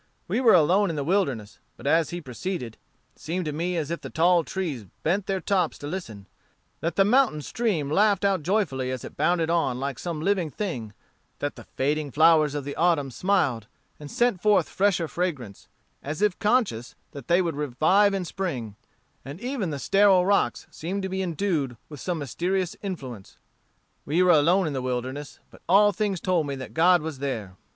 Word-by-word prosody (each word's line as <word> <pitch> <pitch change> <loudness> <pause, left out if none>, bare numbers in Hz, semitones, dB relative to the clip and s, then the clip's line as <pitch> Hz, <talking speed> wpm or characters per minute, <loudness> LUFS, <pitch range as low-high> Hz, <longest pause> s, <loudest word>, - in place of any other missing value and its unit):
We 215 +8 0
were 230 -6 +6
alone 180 +5 +4
in 165 - -3
the 145 - -2
wilderness, 140 - -1 0.2
but - - -13
as 160 +3 +3
he 175 0 -5
proceeded, 130 - -5 0.4
it - - -29
seemed 175 +2 -3
to 150 - -3
me 175 +3 -2
as 155 -1 -2
if 170 - -3
the - - -7
tall 170 +1 +3
trees 150 - -4 0.2
bent 190 +5 0
their 195 -1 0
tops 185 -4 0
to - - -9
listen; 130 - -6 0.5
that 165 +1 -2
the 195 - +4
mountain 220 - +3
stream 210 - -1
laughed 200 +6 +2
out 195 -4 +2
joyfully 150 -8 0
as 130 -2 -4
it - - -10
bounded 170 -2 +1
on 135 -7 +1
like 135 -2 -4
some 170 -3 -4
living 180 -1 0
thing 130 - -5 0.4
that 145 - -3
the - - -12
fading 145 +2 0
flowers 155 +1 +4
of 145 -1 -4
autumn 165 -6 +1
smiled, 135 - 0 0.3
and 145 -1 -9
sent 240 -3 +1
forth 210 -1 +3
fresher 185 -4 +1
fragrance, 145 - -4 0.3
as 155 +8 -4
if 210 -4 +1
conscious 210 - 0 0.2
that 140 -4 -10
they 175 +1 +4
would 170 -4 -1
revive 160 +9 +2
in 190 -2 -2
spring; 135 - -4 0.5
and 140 +6 -8
even 245 -5 -3
the 145 - -3
sterile 195 +5 +4
rocks 200 +1 +1
seemed 190 +5 -4
to 190 - -2
be 190 0 -2
endued 165 - -1
with 150 -2 -9
some 180 -2 -2
mysterious 175 +6 -2
influence. 130 - -7 0.7
We 165 +5 +2
were 180 - +5
alone 175 +4 +4
in 155 - -2
the 130 - -2
wilderness, 130 +3 -4
but - - -17
all 205 +3 +6
things 205 -3 -1
told 170 -3 0
me 140 - -3
that 130 -1 -8
God 175 0 +4
was 155 -4 -5
there. 110 -9 -4
165 Hz, 190 wpm, -25 LUFS, 140-190 Hz, 0.7 s, were